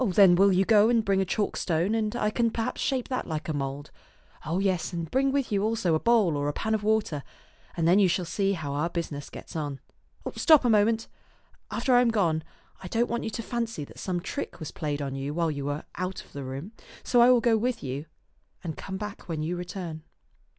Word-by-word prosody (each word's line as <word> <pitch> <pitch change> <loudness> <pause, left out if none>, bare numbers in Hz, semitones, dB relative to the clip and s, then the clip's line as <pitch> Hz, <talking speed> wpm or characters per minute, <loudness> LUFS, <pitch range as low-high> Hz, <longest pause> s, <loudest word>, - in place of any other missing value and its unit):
Then 195 -4 +6
will 195 +3 +5
you 190 +1 +3
go 215 0 +5
and 230 -2 +2
bring 195 -1 +2
a - - +1
chalk 205 +2 -1
stone, 170 +4 0
and 220 0 0
I 215 -3 0
can 230 +1 +2
perhaps 225 0 -3
shape 260 -3 -1
that 255 - -2
like 155 -2 -4
a 160 - -1
mould. 140 0 -4 0.5
Oh 165 +3 -2
yes, 190 -2 0
and 170 -2 -4
bring 270 +1 +2
with 275 -4 -1
you 200 -1 +1
also 220 -6 +1
a 155 - +3
bowl 220 -8 +3
or 145 0 -1
a 145 - -1
pan 220 +7 -1
of 215 - +1
water; 210 -8 +1 0.6
and 165 - +1
thei. 175 - +6
you 195 - +5
shall 180 0 0
see 195 +3 0
how 155 -6 -4
our 150 +4 0
busi 170 -2 -3
ness 145 -1 -6
gets - - -10
on. 145 -3 -3 0.6
Stop 310 -6 +5
a 240 - +4
moment. 220 +1 +3 0.6
After 260 - 0
I 245 - +7
am 245 - +3
gone, 170 -8 +1 0.4
I 185 - -7
don't 230 +5 0
want 235 - -2
you - - -1
to 230 +1 -5
fancy 230 -9 -3
that - - -14
some 180 -2 -2
trick 280 +10 -5
was 155 - -6
played 150 -2 -3
you 135 +1 -4
while 165 -2 +1
you 140 -2 -4
were 145 +2 -3
out 185 +1 -4
of - - -23
the 140 - -5
room, 135 +9 -6 0.3
and - - -19
so 245 - +5
I 240 - +7
will 250 -1 +6
go 230 -1 +3
with 235 +2 -1
you 140 +3 -4 0.6
and 160 -4 -4
come 190 0 -6
back 210 -2 -7
when 155 -2 -2
you 170 +3 -2
return." 175 -2 -6
190 Hz, 240 wpm, -27 LUFS, 155-225 Hz, 0.6 s, I